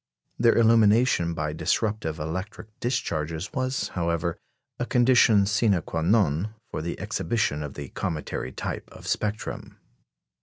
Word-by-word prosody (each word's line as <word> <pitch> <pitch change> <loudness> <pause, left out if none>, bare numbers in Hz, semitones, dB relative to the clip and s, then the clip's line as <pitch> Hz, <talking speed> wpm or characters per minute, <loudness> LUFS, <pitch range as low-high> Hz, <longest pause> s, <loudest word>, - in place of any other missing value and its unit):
Their 115 0 +5
illumination 110 -5 +4
by 75 -1 -2
disruptive 105 -1 -1
electric 95 +7 -6
discharges 85 - -2
was, 130 0 -1
however, 85 -1 -1 0.4
a 120 - 0
condition 120 -4 +5
sine 105 -2 +2
quâ 80 -1 -3
non 100 +1 +2 0.2
for - - -3
the 85 +2 -4
exhibition 105 -7 -1
of 75 -2 -6
the 70 -2 -7
cometary 75 -5 -4
type - - -5
of - - -13
spectrum. 105 0 -3
100 Hz, 125 wpm, -26 LUFS, 80-115 Hz, 0.4 s, Their